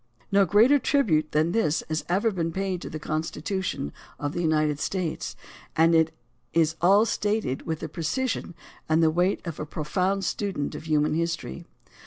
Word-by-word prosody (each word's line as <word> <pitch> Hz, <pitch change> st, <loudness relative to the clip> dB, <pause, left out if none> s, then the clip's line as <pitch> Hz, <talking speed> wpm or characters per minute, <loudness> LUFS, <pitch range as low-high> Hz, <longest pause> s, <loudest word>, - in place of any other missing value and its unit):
No 200 Hz, 0 st, +5 dB
greater 225 Hz, -, +5 dB
tribute 175 Hz, -, +2 dB
than 155 Hz, +2 st, +2 dB
this 175 Hz, -7 st, +1 dB
has 155 Hz, 0 st, -2 dB
ever 205 Hz, +6 st, +2 dB
been 165 Hz, -4 st, -2 dB
paid 190 Hz, 0 st, -2 dB
to -, -, -6 dB
the 155 Hz, -, -5 dB
Constitution 155 Hz, -, -3 dB, 0.2 s
of 145 Hz, 0 st, -3 dB
the 175 Hz, -, -2 dB
United 155 Hz, -3 st, +1 dB
States, 180 Hz, -3 st, -3 dB, 0.4 s
and 165 Hz, +1 st, +5 dB
it 160 Hz, -1 st, +4 dB, 0.4 s
is 165 Hz, -1 st, +3 dB
all 200 Hz, +5 st, +6 dB
stated 210 Hz, -, -1 dB
with 160 Hz, -1 st, -2 dB
the -, -, -3 dB
precision 175 Hz, -, -2 dB, 0.3 s
and 160 Hz, +1 st, +4 dB
the 160 Hz, -, +4 dB
weight 180 Hz, +4 st, +1 dB
of 170 Hz, -3 st, -5 dB
a -, -, -3 dB
profound 185 Hz, +6 st, -1 dB
student 190 Hz, -9 st, -2 dB
of -, -, -8 dB
human 150 Hz, -1 st, +2 dB
history. 165 Hz, -, -3 dB
165 Hz, 170 wpm, -26 LUFS, 155-195 Hz, 0.4 s, all